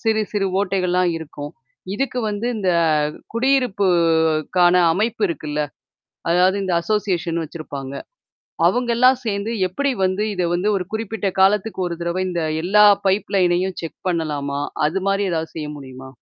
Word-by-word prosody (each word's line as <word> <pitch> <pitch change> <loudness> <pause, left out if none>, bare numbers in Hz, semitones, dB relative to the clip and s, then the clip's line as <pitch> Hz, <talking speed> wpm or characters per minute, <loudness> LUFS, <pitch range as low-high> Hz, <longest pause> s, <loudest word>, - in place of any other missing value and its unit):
சிறு, 220 -2 +1
சிறு 200 -2 0
ஓட்டைகள்லாம் 180 -2 +1
இருக்கும். 150 -2 -8 0.4
இதுக்கு 265 +2 -2
வந்து 210 +2 -3
இந்த 190 -3 0 0.6
குடியிருப்புக்கான 180 - +2 0.2
அமைப்பு 220 +5 -1
இருக்குல்ல? 150 -3 -3 0.7
அதாவது 180 +3 +4
இந்த 185 - -1
அசோசியேஷன் 175 -5 -1
வச்சிருப்பாங்க. 140 -4 -7 0.7
அவங்கல்லாம் 245 +4 +3
சேர்ந்து 200 0 -2 0.2
எப்படி 280 +10 -1
வந்து 185 +2 0
இத 180 - -1
வந்து 180 +4 0
ஒரு 185 - -2
குறிப்பிட்ட 220 -2 -2
காலத்துக்கு 200 +1 +2
ஒரு 170 - -4
தடவ 170 +2 -2
இந்த 175 -2 -2 0.2
எல்லா 210 +3 +5 0.2
பைப் 195 +2 +1
லைனையும் 180 0 +1
செக் 165 - -7
பண்ணலாமா? 145 -5 -2 0.3
அது 175 +6 -1
மாரி 195 +1 +1
ஏதாவது 160 -1 -3
செய்ய 155 -2 -4
முடியுமா? 130 -2 -10
185 Hz, 135 wpm, -21 LUFS, 165-210 Hz, 0.7 s, எல்லா